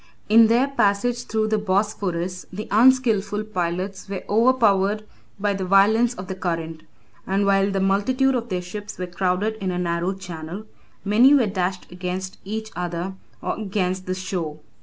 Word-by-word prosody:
In 225 +1 +7
their 240 +4 +3
passage 240 -1 +1
through 220 -1 0
the 215 0 +1
Bosphorus, 185 -3 -1
the 210 +3 -6
unskilful 220 -3 +3
pilots 185 -1 -3
were 195 -2 -4
overpowered 215 -3 +3 0.4
by 205 0 +1
the 195 -1 -3
violence 215 +6 +4
of 185 - -7
the 190 - -5
current; 165 -3 -3 0.5
and 195 +1 +1
while 195 0 +3
the 195 -1 -1
multitude 230 +8 +2
of 240 -2 -2
their 180 -2 -2
ships 205 +4 -7
were 185 - -3
crowded 185 +4 -1
in 190 - -1
a 180 - -2
narrow 175 +1 -1
channel, 180 +1 -7 0.4
many 240 +8 +6
were 260 -5 +4
dashed 185 -3 -3
against 185 +1 -5
each 220 +2 -5
other, 175 +1 -3 0.3
or - - -2
against 185 -3 -2
the 185 - -1
shore. 180 -5 -4
195 Hz, 160 wpm, -23 LUFS, 185-215 Hz, 0.5 s, In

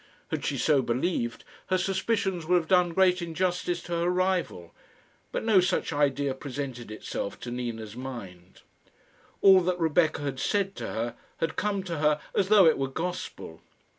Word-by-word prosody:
Had - - -3
she - - -1
so 145 -4 +3
believed, 120 -1 -1 0.2
her 185 - +2
suspicions 190 -2 -1
would 180 - +4
have 170 -2 +1
done 180 -1 +4
great 185 -1 +4
injustice 175 +1 -1
to 175 - -10
her 170 +1 +1
rival; 180 - -1 0.6
but - - -2
no 220 -4 +5
such 180 -2 0
idea 145 -1 +1
presented 130 -3 -6
itself 110 -2 -5
to 120 - -6
Nina's 115 -3 -5
mind. 100 -9 -9 0.8
All 190 -1 +8
that 180 0 -1
Rebecca 160 -2 +2
had 135 -2 -3
said 195 -2 0
to - - -4
her 115 +1 -3 0.2
had 165 -1 -2
come 205 -2 -1
to 170 -4 -4
her 150 0 +3
as 190 - +2
though 205 -2 +7
it 160 - +4
were 135 - 0
gospel. 160 - -5
165 Hz, 165 wpm, -27 LUFS, 130-185 Hz, 0.8 s, All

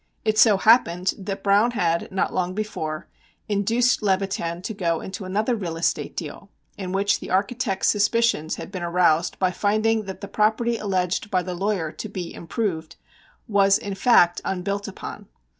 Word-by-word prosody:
It 215 -1 +2
so 210 -2 +6
happened 185 -4 +4
that 195 0 -5
Browne 205 +4 +4
had, 170 -2 0
not 190 - -1
long 185 0 -1
before, 170 -7 -4 0.4
induced 230 +5 +2
Levitan 190 -3 -1
to 220 - -4
go 170 -5 -1
into 190 +1 -7
another 215 +6 0
real 175 -6 -4
estate 165 0 -1
deal, - - -7 0.3
in 190 -3 -5
which 200 +1 +1
the - - -8
architect's 195 +1 0
suspicions 210 -6 +1
had - - -8
been 185 -3 -5
aroused 170 -1 +2
by 185 -1 +1
finding 215 +2 +1
that 190 -1 -7
the 200 - -6
property 220 +3 +1
alleged 190 -1 -1
by 185 -3 +1
the 180 - -4
lawyer 185 -3 -1
to 215 - -7
be 185 -4 -6
"improved" 165 -3 -3 0.5
was, 200 -2 +4
in 200 - -5
fact, 190 -5 +4
unbuilt 200 +2 -3
upon. 200 0 -8
195 Hz, 165 wpm, -23 LUFS, 180-215 Hz, 0.5 s, so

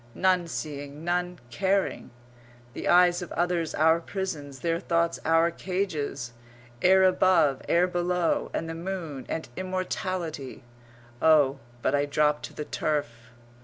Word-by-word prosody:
None 185 -2 +2
seeing, 145 -2 -6
none 180 +1 -1
caring. 195 +6 0 0.6
The - - -5
eyes 175 0 +5
of 175 - -7
others 175 -2 0
our 160 +2 +4
prisons; 165 -7 -5
their 165 0 0
thoughts 170 -1 0
our 165 +1 +4
cages. 155 -10 -3 0.5
Air 190 +1 +6
above, 180 -6 +4
air 175 +1 +4
below. 180 -1 0
And 165 - -3
the 165 - -4
moon 165 -6 -5
and 160 - -3
immortality.... 185 -6 -4 0.6
Oh, 145 -4 +4 0.2
but - - +1
I 145 0 +2
drop 150 +1 +2
to - - -8
the 150 - -5
turf! 120 -8 -3
165 Hz, 130 wpm, -27 LUFS, 150-180 Hz, 0.6 s, Air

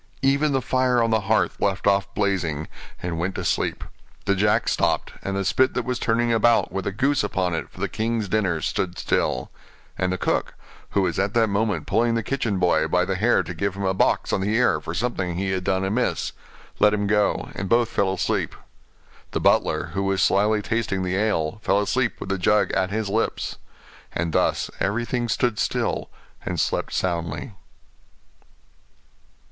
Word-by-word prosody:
Even 140 +2 +3
the 135 -2 0
fire 130 -1 +2
on 115 - +1
the 110 -1 +2
hearth 110 - +1
left 100 -1 0
off 100 -1 +2
blazing, 85 -7 0 0.4
and 85 -2 -3
went 90 +3 -2
to 90 - -4
sleep; 80 - 0 0.4
the 100 - +3
jack 105 +2 +2
stopped, - - 0
and 100 0 -3
the 100 - -1
spit 130 +7 +2
that 125 - -1
was 125 -1 -2
turning 120 +1 +1
about 115 -2 +3
with 95 +1 -3
a - - 0
goose 135 +7 +1
upon 90 -2 -1
it 80 -2 -3
for - - -16
the - - 0
king's 110 -1 -2
dinner 95 -5 0
stood 90 +4 -2
still; - - -1 0.5
and 90 -1 +1
the 95 - -1
cook, - - -1 0.4
who 100 - +4
was 90 -2 -1
at 100 +3 0
that 115 -2 +3
moment 100 -5 0
pulling 115 +5 +2
the 115 - 0
kitchen 115 -5 -1
boy 85 -3 +2
by 90 +2 +2
the 95 - -1
hair 110 +6 +3
to 90 - -6
give 100 +3 -2
him 100 - -4
a 95 - +2
box 95 - +1
on - - +1
the 105 +3 0
ear 105 -10 +3
for 80 +2 -5
something 95 -5 -1
he 95 +2 -1
had 95 -1 -1
done 95 +1 0
amiss, 110 +6 0 0.5
let 105 0 +5
him 105 0 -1
go, 105 0 +1
and 95 0 -4
both 120 -1 +3
fell 95 -1 +1
asleep; 95 - -1 0.8
the - - 0
butler, - - +2
who 100 - -1
was 95 -1 +1
slyly 105 +1 +3
tasting 110 -4 -1
the 90 0 -1
ale, 100 -3 0
fell 100 0 +2
asleep 120 +4 0
with - - -6
the 100 -1 -1
jug 105 +3 +3
at 95 - +1
his 110 +1 -2
lips: 110 +3 -2 0.5
and 85 -1 -2
thus - - +1
everything 120 +4 -1
stood 110 0 0
still, - - -1 0.3
and - - -3
slept - - 0
soundly. 85 - -2
100 Hz, 190 wpm, -24 LUFS, 95-115 Hz, 0.8 s, let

